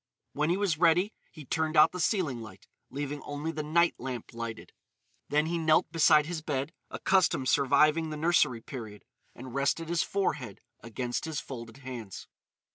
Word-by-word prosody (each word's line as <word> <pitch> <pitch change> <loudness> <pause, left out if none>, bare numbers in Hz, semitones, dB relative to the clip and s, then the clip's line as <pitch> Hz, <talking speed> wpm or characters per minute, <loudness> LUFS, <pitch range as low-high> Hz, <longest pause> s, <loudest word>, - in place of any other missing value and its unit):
When 150 +2 0
he 175 - +2
was 190 -6 0
ready 180 +5 +3 0.2
he 155 -3 -11
turned 160 +3 -1
out 150 - +7
the 180 - -6
ceiling 160 - 0
light, 110 - -12 0.2
leaving 145 +1 -4
only 145 +3 -4
the 155 - -4
night 170 +3 +3
lamp 125 -3 -6
lighted. 115 -1 -6 0.6
Then 150 +1 +2
he 170 +1 -1
knelt 160 0 +3
beside 155 -2 +5
his 165 0 -4
bed,—a 140 -1 -5
custom 185 -8 +3
surviving 150 +4 +3
the 155 - -5
nursery 150 -7 +2
period,—and 120 +2 -11
rested 140 +4 0
his 170 -1 +1
forehead 145 - -2 0.2
against 120 +4 -4
his 160 -2 -3
folded 115 -2 -8
hands. 115 -7 -7
150 Hz, 160 wpm, -29 LUFS, 130-165 Hz, 0.6 s, out